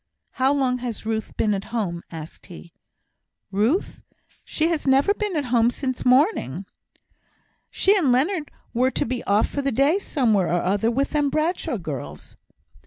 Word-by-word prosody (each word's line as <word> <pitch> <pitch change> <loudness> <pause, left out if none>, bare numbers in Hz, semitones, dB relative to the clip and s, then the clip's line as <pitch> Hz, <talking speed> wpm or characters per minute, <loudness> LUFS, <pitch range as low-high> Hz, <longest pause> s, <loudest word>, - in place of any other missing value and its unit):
"How 260 +1 +2
long 260 -3 +1
has 240 -4 -5
Ruth 220 -1 -3
been 210 -1 +2
at 195 0 -3
home?" 195 -8 -3
asked 160 -1 -9
he. 175 -1 -12 0.8
"Ruth! 220 - 0 0.4
She 315 - 0
has 320 -4 -2
never 270 +9 +4
been 420 -3 -3
at 295 -3 0
home 235 -1 +5
sin' 260 +1 -2
morning. 250 - +2 1.0
She 395 +2 +3
and 320 -10 +3
Leonard 300 +5 +1 0.2
were 255 +2 +2
to - - -1
be 245 0 -3
off 205 +2 +3
for 285 - -3
the 275 0 0
day 280 - +3
somewhere 225 - +1
or 175 0 0
other 205 +5 +1
with 270 +4 0
them 295 -2 +1
Bradshaw 315 -2 -1
girls." 135 - -7
250 Hz, 165 wpm, -23 LUFS, 205-290 Hz, 1.0 s, home